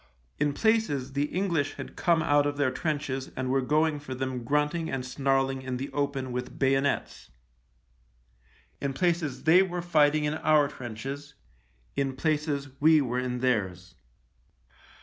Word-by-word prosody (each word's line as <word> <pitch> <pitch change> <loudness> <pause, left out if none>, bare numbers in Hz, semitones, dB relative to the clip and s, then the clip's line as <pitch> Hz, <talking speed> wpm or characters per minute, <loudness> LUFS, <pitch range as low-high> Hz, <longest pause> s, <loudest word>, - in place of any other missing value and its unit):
In 145 -1 +1
places 150 - +1
the 140 +1 +1
English 165 -4 -1
had - - -8
come 170 -2 +2
out 145 -1 +3
of 145 0 -3
their 140 -3 +2
trenches 135 -2 -2
and 130 0 -2
were 135 0 +2
going 150 +3 +1
for 135 -3 -7
them 130 -1 -3
grunting 150 +5 0
and 130 -1 -3
snarling 135 0 0
in 130 -1 -4
the 135 +2 -5
open 140 -2 -2
with 125 +1 -5
bayonets. 135 +1 0 1.5
In 140 -1 -1
places 170 -4 0
they 165 +4 +6
were 180 -2 -2
fighting 155 -3 +3
in 150 0 0
our 155 -2 +3
trenches 135 +5 -7 0.3
— - - -38
in 135 -1 -1
places 150 -1 -1
we 155 +1 +6
were 125 -3 -1
in 125 -1 -3
theirs. 95 -8 -1
140 Hz, 150 wpm, -28 LUFS, 130-155 Hz, 1.5 s, they